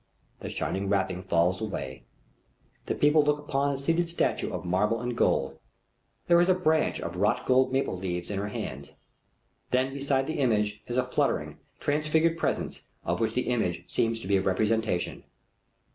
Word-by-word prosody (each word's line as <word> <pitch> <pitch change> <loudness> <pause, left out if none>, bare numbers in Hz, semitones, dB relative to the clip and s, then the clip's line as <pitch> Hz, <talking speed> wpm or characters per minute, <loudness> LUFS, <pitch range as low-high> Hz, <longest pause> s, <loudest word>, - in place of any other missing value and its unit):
The - - -6
shining 95 +1 -2
wrapping 95 -2 0
falls 90 +1 +1
away. 70 -11 -5 0.8
The - - 0
people 150 +1 +5
look 150 0 +2
upon 140 -1 0
a 140 - -2
seated 165 +5 0
statue 170 - 0
of - - -5
marble 105 +6 +1
and 120 0 -3
gold. - - +1 0.7
There 170 0 +5
is 175 - +2
a 185 - +5
branch 160 -4 +1
of 85 +1 -5
wrought 105 +3 +1
gold 130 0 +3
maple 135 -6 0
leaves 90 0 -4
in 100 - -2
her 100 - -2
hands. 70 -8 -6 0.8
Then 130 +1 +1
beside 140 -1 0
the 155 - -3
image 105 -5 +1
is 120 - -3
a 130 - +2
fluttering 125 - -1 0.2
transfigured 155 +3 +1
presence - - -2 0.2
of - - 0
which - - 0
the - - +1
image - - 0
seems 115 0 +1
to - - -7
be 100 0 +3
a - - +1
representation. 105 0 0
115 Hz, 175 wpm, -28 LUFS, 95-145 Hz, 0.8 s, people